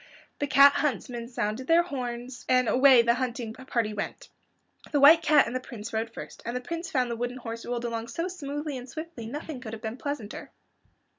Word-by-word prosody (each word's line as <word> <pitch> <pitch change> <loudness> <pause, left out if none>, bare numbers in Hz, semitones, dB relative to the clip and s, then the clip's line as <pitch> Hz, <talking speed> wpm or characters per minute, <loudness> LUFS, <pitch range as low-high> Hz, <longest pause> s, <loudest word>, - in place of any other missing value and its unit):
The 285 - 0
cat 280 +1 +7
huntsmen 245 -5 -2
sounded 235 +1 -3
their 335 +1 +5
horns, 245 -5 -5
and 255 -1 +4
away 260 -1 +6
the 235 0 +4
hunting 240 -2 -3
party 235 -4 -2
went. 210 - -5 0.6
The 290 - +2
White 310 +4 +8
Cat 300 -3 +5
and 235 - -5
the - - +1
Prince 235 -3 -9
rode 225 +1 -2
first, - - -9
and 235 - -4
the - - 0
Prince 335 +6 -5
found 250 -3 0
the - - -2
wooden 245 +2 -3
horse 230 -2 -7
rolled 240 0 -2
along 230 -1 -3
so 335 +7 -3
smoothly 295 -5 -5
and 250 +1 -11
swiftly 315 -7 -7
that - - -8
nothing 295 -2 -6
could 220 -3 -7
have 220 - -7
been 220 +2 -4
pleasanter. 275 -7 -5
250 Hz, 210 wpm, -27 LUFS, 235-285 Hz, 0.6 s, White